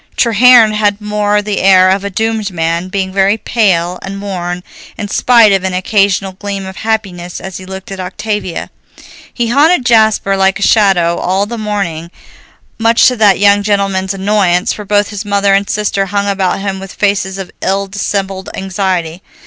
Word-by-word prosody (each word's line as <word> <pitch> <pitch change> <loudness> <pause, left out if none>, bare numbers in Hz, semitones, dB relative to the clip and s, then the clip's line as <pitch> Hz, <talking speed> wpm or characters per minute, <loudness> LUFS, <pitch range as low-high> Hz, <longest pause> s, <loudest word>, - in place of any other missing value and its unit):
Treherne 235 0 +5
had 205 -1 0
more 210 0 0
the 205 -1 -2
air 185 -1 +5
of 195 +1 0
a 200 - -3
doomed 220 +1 -2
man, 170 0 -2
being 190 0 -3
very 195 +2 +2
pale 180 -6 0
and 195 +1 -7
worn, 180 -3 -5 0.3
in 205 -2 -5
spite 230 -1 +4
of 195 -1 +1
an 190 -1 -2
occasional 195 0 +1
gleam 200 0 -6
of 190 -1 -9
happiness 195 -6 -3
as 190 -1 -7
he 185 - -11
looked 190 0 -9
at 195 - -6
Octavia. 190 0 -4 0.6
He 235 -2 -2
haunted 285 +2 +3
Jasper 220 -4 +3
like 195 0 +1
a 200 - -3
shadow 190 -6 +3
all 190 +2 0
the 235 +3 -6
morning, 195 -6 -3 0.7
much 230 +1 +3
to 250 - -3
that 205 -4 +4
young 205 0 +4
gentleman's 195 -2 -1
annoyance, 190 -3 +1
for 210 - -8
both 205 +1 +1
his 205 -1 -5
mother 200 -1 +1
and 200 0 +1
sister 200 -2 -1
hung 200 +1 -1
about 195 -2 -1
him 195 -1 -3
with 195 0 -10
faces 195 -2 -1
of 195 -2 -7
ill 195 +1 0
dissembled 195 -1 -4
anxiety. 185 -3 -3
195 Hz, 175 wpm, -13 LUFS, 190-210 Hz, 0.7 s, Treherne